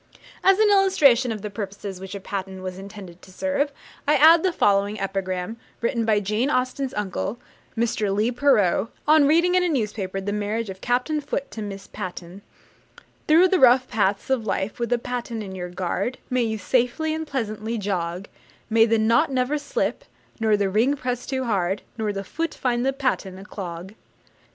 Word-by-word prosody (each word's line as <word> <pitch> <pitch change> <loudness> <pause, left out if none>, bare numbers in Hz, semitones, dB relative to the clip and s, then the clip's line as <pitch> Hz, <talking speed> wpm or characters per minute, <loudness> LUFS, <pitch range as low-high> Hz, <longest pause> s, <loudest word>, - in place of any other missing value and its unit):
As 385 0 +6
an 430 -1 +4
illustration 295 - +4
of 215 -3 -5
the 210 - -4
purposes 200 -2 -6
which 190 +1 -7
a - - -5
patten 190 -1 -5
was 185 0 -5
intended 195 -3 -10
to 190 - -15
serve, 285 +7 -1 0.4
I 300 - +5
add 320 +2 +7
the 375 - +2
following 205 -6 +2
epigram, 195 +1 -3 0.2
written 235 -1 0
by 215 -2 +3
Jane 215 +6 0
Austen's 255 0 -1
uncle, 205 +2 -3 0.4
Mr. 220 -3 0
Leigh 210 +4 +1
Perrot, 230 -6 +2 0.2
on 305 -2 +6
reading 340 +4 +4
in 365 - +4
a 355 - +1
newspaper 210 - -2
the 200 +1 -3
marriage 210 +1 -2
of 190 - -11
Captain 255 +5 0
Foote 280 -1 -4
to 220 - -6
Miss 200 -2 -6
Patten: 180 +1 -7 0.9
Through 335 +4 +6
the 375 - +3
rough 255 0 +6
paths 205 +2 0
of 235 -4 0
life, 195 +3 -2
with 235 -1 -2
a 245 - +4
patten 240 -2 -4
your 180 -1 -5
guard, 185 +7 -2
May 250 0 +2
you 220 -2 -1
safely 250 - 0
and 315 0 -4
pleasantly 225 -3 -3
jog; 185 -2 -3 0.4
May 225 0 +5
the 225 0 +3
knot 230 +7 +3
never 265 +3 0
slip, - - -2 0.4
nor 220 -2 +3
the 200 -2 0
ring 235 +8 +3
press 250 -3 -4
too 260 -1 -1
hard, 195 -4 -1 0.2
Nor 215 -1 0
the 195 -1 -4
Foot 330 - -3
find 245 -2 0
the 270 - +2
Patten 255 -9 -2
a 195 - -11
clog. 180 -2 -7
225 Hz, 185 wpm, -24 LUFS, 195-265 Hz, 0.9 s, add